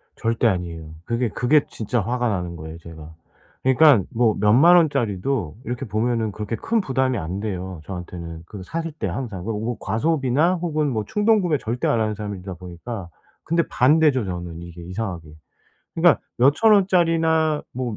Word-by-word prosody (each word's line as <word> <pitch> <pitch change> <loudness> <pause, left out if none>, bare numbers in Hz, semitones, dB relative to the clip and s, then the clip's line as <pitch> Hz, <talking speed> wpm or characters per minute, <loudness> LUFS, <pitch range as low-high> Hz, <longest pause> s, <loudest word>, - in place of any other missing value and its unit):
절대 115 0 +1
아니에요. 85 -4 -3
그게, 120 0 -1
그게 135 +7 +2
진짜 115 +2 -2
화가 120 +4 -1
나는 90 -4 -3
거예요, 80 0 -8
제가. 80 -1 -12 0.5
그러니깐 130 - +5
뭐 115 -2 +2
몇 105 0 +4
만 165 +9 +7
원짜리도 120 - +1
이렇게 125 +3 -4
보면은 110 0 -1
그렇게 105 +2 -4
큰 225 - 0
부담이 130 -5 0
안 85 +4 -4
돼요, 95 -4 -5
저한테는. 85 -3 -7
그 100 +2 -10
사실 165 - -4
때 150 - -4
항상 100 -2 -5
그 115 - -2
오 110 +3 -3
과소비나 140 - +1
혹은 155 -4 -1
뭐 110 -3 -2
충동구매 210 -7 +2
절대 120 +2 -2
안 115 - +2
하는 110 -1 0
사람이다 100 -3 -6
보니까. 90 +3 -8 0.3
근데 170 +1 +1
반대죠, 140 -2 +3
저는 90 -2 -6
이게 85 0 -10
이상하게. 90 -3 -5 0.7
그러니까 165 -6 +4 0.2
몇천 145 - +5
원짜리나 165 -5 +3
뭐 120 -3 -4
115 Hz, 355 characters per minute, -22 LUFS, 90-150 Hz, 0.7 s, 만